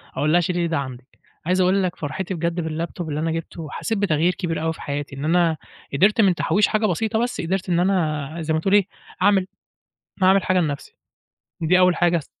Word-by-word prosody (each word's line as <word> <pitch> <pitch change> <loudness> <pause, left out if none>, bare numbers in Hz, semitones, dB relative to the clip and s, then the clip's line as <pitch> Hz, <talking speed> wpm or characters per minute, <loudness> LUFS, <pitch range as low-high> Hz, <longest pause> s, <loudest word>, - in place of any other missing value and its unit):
أقول 150 +1 +1
لها 175 +1 +4
شيلي 175 +1 -1
لي 170 - +1
ده 160 -2 -1
عندِك، 130 -2 -6 0.4
عايز 185 +1 +2
أقول 190 +2 +3
لك 180 -2 -2
فرحتي 170 +6 -4
بجد 170 0 -2
بالLaptop 165 +3 -4
اللي 150 -1 -3
أنا 165 +1 -1
جبته 165 0 -5
حسيت 225 -2 -2
بتغيير 175 -3 +2
كبير 165 -4 -3
أوي 160 - 0
في - - -13
حياتي، 145 -1 -4
إن 140 +2 -5
أنا 165 -1 +2 0.4
قدرت 200 +10 +4
من 190 -4 +4
تحويش 205 +4 +2
حاجة 215 0 +1
بسيطة 220 +4 0
بس 245 - -3
قدرت 185 +2 -2
إن 170 - +2
أنا 160 -5 0
زي 160 0 -1
ما 160 - +1
تقول 190 +4 0
إيه، 205 -2 +5 0.3
أعمل 195 -2 +3 0.8
أعمل 190 +1 +5
حاجة 185 0 +2
لنفسي، 145 -5 -3 0.7
دي 175 +3 +3
أول 180 -2 +4
حاجة 175 -1 +3
اس 150 - -9
175 Hz, 215 wpm, -22 LUFS, 155-190 Hz, 0.8 s, إيه